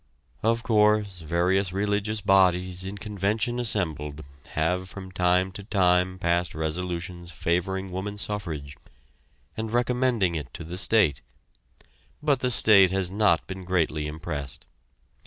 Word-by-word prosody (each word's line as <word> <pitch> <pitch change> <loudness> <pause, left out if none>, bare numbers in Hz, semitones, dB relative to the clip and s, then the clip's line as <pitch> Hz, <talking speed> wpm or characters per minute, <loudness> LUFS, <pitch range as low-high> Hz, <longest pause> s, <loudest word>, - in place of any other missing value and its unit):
Of 115 +1 +1
course, 105 -4 +2
various 90 +4 +1
religious 105 +2 -1
bodies 95 -2 +3
in 95 +2 -6
convention 105 +4 -1
assembled 75 -10 -1 0.3
have 90 +4 0
from 95 -1 -9
time 90 0 +2
to 100 +2 -8
time 90 -3 +2
passed 85 -1 0
resolutions 85 +2 -3
favoring 90 +3 -1
woman 100 +3 -4
suffrage, 80 -9 -4 0.8
and 110 0 -4
recommending 120 -5 +1
it 75 -6 -5
to - - -6
the 85 +3 -4
state, 95 -11 +3 1.0
but 150 -3 +1
the 125 - 0
state 105 -5 +6
has 95 -1 -1
not 100 -5 +2
been 95 0 -7
greatly 80 -4 0
impressed. 75 -3 -6
95 Hz, 125 wpm, -26 LUFS, 85-105 Hz, 1.0 s, state